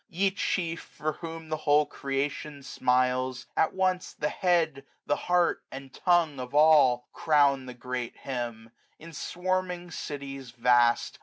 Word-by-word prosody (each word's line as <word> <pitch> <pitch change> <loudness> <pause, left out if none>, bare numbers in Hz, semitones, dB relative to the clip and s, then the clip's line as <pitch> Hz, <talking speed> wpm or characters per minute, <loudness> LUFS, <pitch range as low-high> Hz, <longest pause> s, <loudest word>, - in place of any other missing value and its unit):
8q - - -19
Ye 195 +1 +3
chief, 170 -3 -2
for 155 +1 -4
whom 165 -1 -8
the 155 - -1
whole 150 0 +3
creation 140 +1 -4
smiles. 130 0 0
At 160 - +2
once 185 -1 0
the 150 - -2
head, 165 -6 +1 0.2
the. 145 - +1
heart, 175 -1 +2
and 135 0 -9
tongue 170 -6 +2
of 125 +2 -6
all. 145 -5 +5
Crown 140 -4 +3
the 125 - -8
great 125 0 -5
hymn! 120 -3 -5 0.3
in 165 +1 -12
swarming 180 +1 -2
cities 135 -3 -6
vast. 120 0 +2
145 Hz, 145 wpm, -28 LUFS, 130-165 Hz, 0.3 s, all